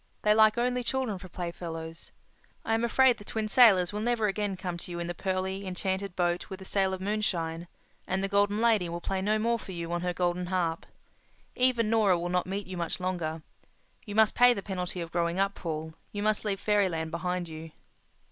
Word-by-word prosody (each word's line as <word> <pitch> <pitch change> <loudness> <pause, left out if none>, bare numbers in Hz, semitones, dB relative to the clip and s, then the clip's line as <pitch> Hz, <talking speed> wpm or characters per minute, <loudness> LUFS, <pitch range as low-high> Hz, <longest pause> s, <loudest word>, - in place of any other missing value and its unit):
They 210 - +5
like 215 +1 +5
only 250 +1 +1
children 250 -6 -1
for 185 - -11
playfellows. 165 -2 -6 0.5
I 225 - +1
am 225 +1 +1
afraid 245 +1 +4
the - - -10
Twin 215 +1 -3
Sailors 210 -6 +6
will 210 - -2
never 235 0 +1
again 205 -1 -1
come 180 -1 -4
to - - -7
you 170 -1 -5
in 170 - -2
the 175 - -3
pearly, 190 +1 -2
enchanted 190 0 -2
boat 175 +1 0
with 190 - -6
the 190 - -11
sail 195 -1 +1
of 185 - -10
moonshine; 175 -5 -2 0.4
and 190 +1 -1
the - - +1
Golden 205 +1 +2
Lady 220 -6 +3
will 170 +1 -4
play 190 +2 -2
no 210 +3 +2
more 230 +2 +1
for 190 - -9
you 170 -1 -5
on 175 0 -1
her 180 0 0
golden 180 0 -1
harp. 175 -3 -1 0.7
Even 245 -3 +2
Nora 210 -5 +4
will 175 +1 -3
not 180 0 0
meet 195 +1 -3
you 185 -1 -7
much 170 +1 -2
longer. 170 -4 -3 0.6
You 205 -4 -7
must 220 0 +5
pay 245 0 +6
the 200 - -5
penalty 180 -2 -3
of 165 -1 -6
growing 170 +1 0
up, 195 0 +2
Paul. 160 -3 -5 0.2
You 205 0 -4
must 215 0 +1
leave 200 -2 -1
fairyland 185 -7 +1
behind 180 +1 -2
you." 160 0 -8
190 Hz, 215 wpm, -29 LUFS, 175-215 Hz, 0.7 s, Sailors